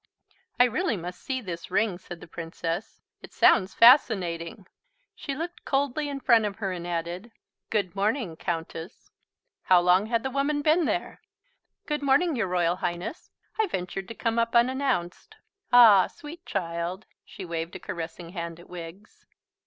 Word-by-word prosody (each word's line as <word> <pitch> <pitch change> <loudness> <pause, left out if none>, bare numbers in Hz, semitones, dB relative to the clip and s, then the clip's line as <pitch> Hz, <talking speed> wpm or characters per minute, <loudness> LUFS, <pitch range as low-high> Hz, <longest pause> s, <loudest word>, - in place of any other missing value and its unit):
"I - - +9
really 250 - 0
must 180 +1 -7
see 260 -1 -3
this 170 -6 -7
ring," 190 -1 0
said 175 -2 -10
the - - -11
Princess. 165 +4 -5 0.2
"It - - -12
sounds 190 +1 +4
fascinating." 195 - +4 0.5
She 275 - -5
looked 335 +4 -6
coldly 285 +2 -1
in 275 -1 -5
front 230 -5 +4
of 205 -1 -3
her 195 -3 -3
and 175 -1 -5
added, 175 +6 -4 0.4
"Good 200 -4 -1
morning, 205 - -1
Countess." 165 +1 -6 0.5
(How 185 -1 +6
long 180 +4 +3
had 230 0 0
the 265 - -2
woman 290 +2 0
been 320 +2 +3
there?) - - -3 0.6
"Good 300 -1 -2
morning, 285 +4 +3
your 225 -5 0
Royal 175 -1 +1
Highness. 175 - -4 0.3
I 440 - +3
ventured 185 - -4
to 230 - -8
come 230 +1 0
up 230 0 0
unannounced. 255 - 0 0.4
Ah, 230 -6 +8
sweet 340 +2 -12
child." 170 +1 -3 0.2
She 190 - -9
waved 165 +1 -4
a - - -6
caressing 170 -2 -6
hand 170 -2 -6
at 175 - -15
Wiggs. 180 +3 -11
195 Hz, 160 wpm, -26 LUFS, 175-260 Hz, 0.6 s, I